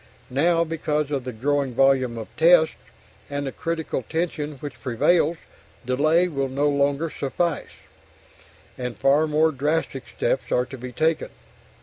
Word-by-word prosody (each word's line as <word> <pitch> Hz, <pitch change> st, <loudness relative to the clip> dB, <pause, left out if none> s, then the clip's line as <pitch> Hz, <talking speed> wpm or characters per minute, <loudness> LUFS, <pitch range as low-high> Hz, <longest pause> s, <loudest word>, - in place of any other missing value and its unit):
Now, 165 Hz, +5 st, +3 dB
because 150 Hz, -2 st, -2 dB
of 135 Hz, -3 st, -2 dB
the 130 Hz, -, -3 dB
growing 135 Hz, +2 st, -1 dB
volume 130 Hz, -3 st, +3 dB
of 110 Hz, -, -6 dB
tests, 160 Hz, 0 st, +5 dB, 0.6 s
and 145 Hz, 0 st, -3 dB
the 135 Hz, -, -3 dB
critical 165 Hz, -4 st, -3 dB
tension 160 Hz, -2 st, -2 dB
which 145 Hz, +1 st, -9 dB
prevails, 155 Hz, +6 st, +2 dB, 0.5 s
delay 155 Hz, +8 st, +3 dB
will 140 Hz, -5 st, -2 dB
no 140 Hz, +3 st, +1 dB
longer 140 Hz, +3 st, +1 dB
suffice, 170 Hz, +5 st, -2 dB, 1.1 s
and 125 Hz, -1 st, -4 dB
far 145 Hz, +3 st, +3 dB
more 155 Hz, +1 st, +3 dB
drastic 150 Hz, +4 st, -1 dB
steps -, -, -1 dB
are 125 Hz, -, +2 dB
to 130 Hz, +1 st, -9 dB
be 125 Hz, +1 st, -7 dB
taken. 160 Hz, +5 st, 0 dB
145 Hz, 140 wpm, -24 LUFS, 135-160 Hz, 1.1 s, tests